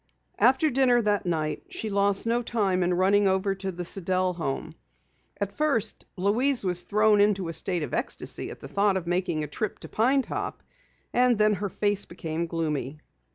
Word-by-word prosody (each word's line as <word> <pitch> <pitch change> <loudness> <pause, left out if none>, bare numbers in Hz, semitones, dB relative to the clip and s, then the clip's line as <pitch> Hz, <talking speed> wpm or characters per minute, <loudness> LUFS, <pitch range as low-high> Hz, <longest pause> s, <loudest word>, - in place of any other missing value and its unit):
After 270 +4 +4
dinner 250 -1 +4
that 205 -3 0
night, 155 -3 -1
she 360 - -4
lost 200 0 +2
no 235 +1 +1
time 200 -6 0
in 175 0 +1
running 195 +2 +3
over 190 +1 +1
to 195 0 -4
the 175 0 -6
Sidell 185 0 0
home. 160 -1 -4 0.7
At 200 -1 -2
first 230 -5 0
Louise 235 +8 +1
was 180 -1 +3
thrown 210 +2 +3
into 200 -4 +2
a - - -4
state 175 -1 0
of - - -6
ecstasy - - -3
at - - -9
the - - -8
thought 200 +5 +2
of 180 - -4
making 175 -3 -1
a - - -4
trip 195 +8 -3
to - - -8
Pine 260 +5 +2
Top - - -5 0.5
and 245 -1 +4
then 210 0 +4
her 200 +1 -3
face 205 +1 -1
became 170 -1 -4
gloomy. 155 -4 -3
195 Hz, 185 wpm, -26 LUFS, 175-215 Hz, 0.7 s, After